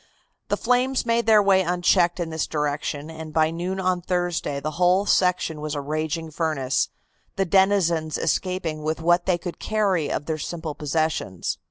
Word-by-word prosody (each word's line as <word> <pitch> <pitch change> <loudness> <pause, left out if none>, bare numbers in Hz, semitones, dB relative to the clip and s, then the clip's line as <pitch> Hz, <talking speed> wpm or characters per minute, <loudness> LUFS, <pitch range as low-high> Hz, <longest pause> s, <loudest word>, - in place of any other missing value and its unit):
The - - 0
flames 250 +2 +1
made 230 0 +1
their 215 -2 +6
way 195 -1 +4
unchecked 175 0 +2
in 165 -2 -3
this 160 0 -2
direction, 150 0 -2
and 160 -1 -8
by 155 0 +2
noon 180 +3 -3
on 185 -1 0
Thursday 175 -5 -1
the 155 +2 -3
whole 180 +3 +4
section 180 -5 +1
was 150 0 -3
a - - -2
raging 155 +2 -3
furnace, 150 -5 0 0.5
the 195 - +1
denizens 175 -4 +2
escaping 170 -3 -1
with 155 +1 -2
what 175 +2 +2
they 180 -2 +3
could 175 0 -7
carry 195 -8 0
of 145 - -2
their 155 -1 -3
simple 160 0 -4
possessions. 150 - -2
170 Hz, 170 wpm, -24 LUFS, 155-185 Hz, 0.5 s, their